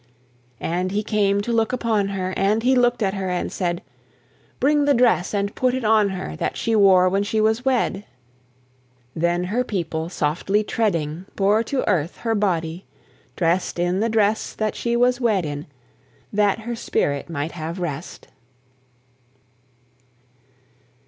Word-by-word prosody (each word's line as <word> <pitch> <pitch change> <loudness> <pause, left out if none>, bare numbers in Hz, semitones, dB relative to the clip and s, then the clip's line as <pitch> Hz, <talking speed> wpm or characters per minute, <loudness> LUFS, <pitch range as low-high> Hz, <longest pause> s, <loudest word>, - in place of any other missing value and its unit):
And 180 +2 -1
he 210 +2 -1
came 205 -2 +1
to 235 +3 -2
look 225 0 +1
upon 225 -5 0
her, 190 -1 -3
And 210 +3 +1
he 260 +2 +4
look'd 245 -2 +2
at 195 -1 0
her 190 -2 -3
and 180 -1 -2
said, 175 -2 -2 0.8
"Bring 290 +2 +3
the 285 -1 +4
dress 230 -8 +3
and 200 0 -1
put 255 0 +1
it 260 -3 -3
on 215 -2 +4
her 180 - -5
That - - -2
she 230 - 0
wore 190 -3 +6
when 195 +2 +1
she 210 +2 -1
was 220 +3 +2
wed." 250 -6 0 1.1
Then 170 +2 +1
her 220 +8 0
people, 165 -7 -3
softly 180 +6 0
treading, 175 -6 -1
Bore 205 +2 +3
to 270 +3 -2
earth 175 -4 0
her 225 -1 -1
body, 175 -4 -1 0.5
drest 175 +1 0
In 175 +2 0
the 225 +2 +1
dress 220 -1 +1
that 215 -1 -1
she 235 0 -1
was 245 +1 +2
wed 210 -7 +2
in, 145 0 -5 0.7
That 205 +1 +2
her 235 +2 -4
spirit 145 - -1
might 155 0 -3
have 165 +2 -6
rest. 165 -2 -5
200 Hz, 155 wpm, -22 LUFS, 175-225 Hz, 1.1 s, wore